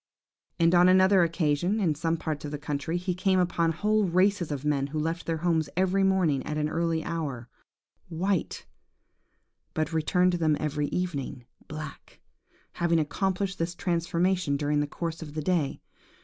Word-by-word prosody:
"And 165 +1 +4
on 180 +1 +6
another 190 +1 +5
occasion, 170 +3 +1
in 175 -7 +2
some 165 +2 -1
parts 155 -2 -4
of 150 - -4
the 150 - -4
country, 145 +3 -3
he 180 +1 -2
came 185 +1 +1
upon 170 -2 +1
whole 210 +5 +1
races 185 -1 +2
of 145 0 -4
men 140 -2 +1
who 150 +2 -5
left 165 +3 -2
their 165 -1 0
homes 160 -3 +1
every 190 +1 +2
morning 185 -8 +2
at 150 - -4
an 150 0 0
early 165 0 0
hour, 145 -8 -4 0.6
white, 180 +2 -2 1.1
but 155 +1 -1
returned 180 +3 +2
to 175 - -2
them 155 -2 +2
every 150 -1 -1
evening 140 -9 -3 0.2
black, 155 -1 -9 0.5
having 170 -1 +1
accomplished 190 +5 -1
this 170 +1 -2
transformation 170 -2 0
during 145 0 0
the 145 - 0
course 165 +2 -5
of 150 -2 -8
the 155 - -2
day. 165 -5 0
165 Hz, 165 wpm, -27 LUFS, 150-180 Hz, 1.1 s, on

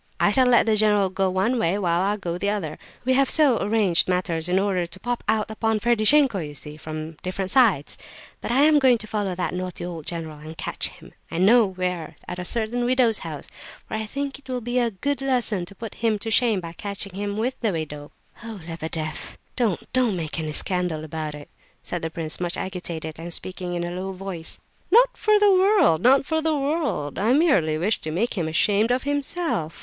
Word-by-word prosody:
I - - +4
shall 260 -2 +4
let 245 -1 +5
the 220 -1 +3
general 210 -3 +3
go 190 0 +1
one 195 +7 +1
way, 190 -2 +1
while 175 -3 +1
I 200 +2 +1
go 175 -3 -4
the 200 - 0
other; 175 -7 -3 0.3
we 260 - +3
have 275 +1 +3
so 290 -7 +5
arranged 200 -4 +2
matters 180 -2 -1
in 180 - +2
order 190 -3 +1
to 170 +2 -9
pop 245 +3 -3
out 220 0 +1
upon 220 0 0
Ferdishenko, 235 +1 +4
you 150 -3 -6
see, 150 +1 -7
from 155 0 -7
different 185 +1 -3
sides. 220 - +3 0.4
But - - -3
I 265 +4 +4
am 300 0 +6
going 260 -3 +5
to 215 - -9
follow 205 -4 -2
that 180 - -2
naughty 180 -1 -4
old 165 -4 -7
general 160 -3 -5
and 155 +1 -10
catch - - -2
him, - - -14 0.2
I - - -5
know 215 +5 +5
where, 180 -4 -3
at 180 - -5
a 180 - -4
certain 235 +4 -1
widow's 245 -3 +2
house; 155 -3 -7 0.4
for - - -9
I 220 0 -2
think 280 +3 -4
it 275 -2 -20
will 255 -1 -1
be 245 +1 -1
a 240 -1 +2
good 270 +8 -3
lesson, 245 -8 0
to 200 - -11
put 225 +1 -7
him 225 -2 +2
to 225 +2 -5
shame 225 -4 +3
by 165 -1 -7
catching 200 +1 -5
him 205 +1 -3
with 245 +4 -2
the 225 -3 +1
widow." 150 -3 -5 0.3
"Oh, 225 -3 -7
Lebedeff, 160 -2 -4 0.2
don't, 220 -8 -1
don't 250 -6 +2
make 165 -2 -3
any 155 -1 -3
scandal 180 -3 0
about 155 -1 -5
it!" 145 -1 -10 0.4
said 175 - -4
the 160 - -2
prince, 160 -1 -4
much 175 -1 -2
agitated, 165 -4 -5
and 170 +1 -6
speaking 180 0 -3
in 175 - -2
a 175 - -3
low 185 +2 -4
voice. 185 -3 -3 0.3
"Not - - +5
for 430 -1 +3
the 415 -1 +5
world, 375 - +4
not 265 +3 +5
for 320 +1 0
the 315 -1 +1
world! 280 - -1
I 220 +5 +3
merely 195 - +3
wish 195 +7 0
to 155 - -4
make 190 +10 -1
him 170 -5 -1
ashamed 205 +7 +2
of 250 +1 +1
himself. 285 - -2
195 Hz, 215 wpm, -24 LUFS, 170-245 Hz, 0.4 s, am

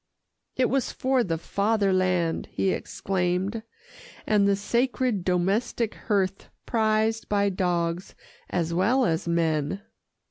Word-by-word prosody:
"It 255 - +2
was 270 -1 0
for 260 -1 +1
the 165 -5 -1
Fatherland," 185 -3 +1
he 190 - +1
exclaimed, 190 +4 -2 0.6
"and 205 -2 +3
the 200 - +3
sacred 235 0 0
domestic 195 +6 0
hearth 195 -3 -1 0.2
prized 220 0 +1
by 200 -1 +2
dogs 175 -1 -1 0.3
as 170 -1 -1
well 230 +9 +3
as 165 -1 -1
men." 165 +2 0
195 Hz, 110 wpm, -26 LUFS, 175-220 Hz, 0.6 s, and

